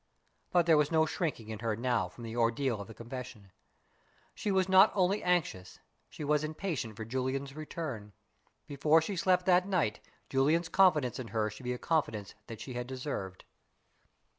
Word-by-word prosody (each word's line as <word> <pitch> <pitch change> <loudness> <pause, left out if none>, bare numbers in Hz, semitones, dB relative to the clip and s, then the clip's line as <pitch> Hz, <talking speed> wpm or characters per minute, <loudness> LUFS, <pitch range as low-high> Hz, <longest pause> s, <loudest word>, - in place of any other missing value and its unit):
But 175 -2 +4
there 165 -2 +5
was 150 +1 +1
no 160 -1 +4
shrinking 150 -9 -3
in 110 -1 -5
her 115 -1 -1
now 120 -5 0
from 120 - -12
the 115 0 -6
ordeal 115 0 +1
of 100 - -8
the 110 - -10
confession. 115 -4 -8 0.8
She - - -3
was 190 -1 +2
not 190 +2 +7
only 195 +1 +2
anxious 165 - -1 0.3
she - - -8
was 150 0 +2
impatient 155 - -3
for 110 - -5
Julian's 130 +3 -3
return. 150 -9 -6 0.5
Before 150 +3 +3
she 175 +5 -3
slept 180 0 +2
that 180 0 +4
night 175 - 0 0.3
Julian's 155 +6 +2
confidence 155 -11 +3
in 125 - -5
her 110 -2 -1
should 110 +5 -11
be 125 - -1
a - - -4
confidence 115 - -1
that 115 -2 -8
she 125 +2 -7
had 120 0 -4
deserved. 130 -8 -5
135 Hz, 175 wpm, -31 LUFS, 115-165 Hz, 0.8 s, not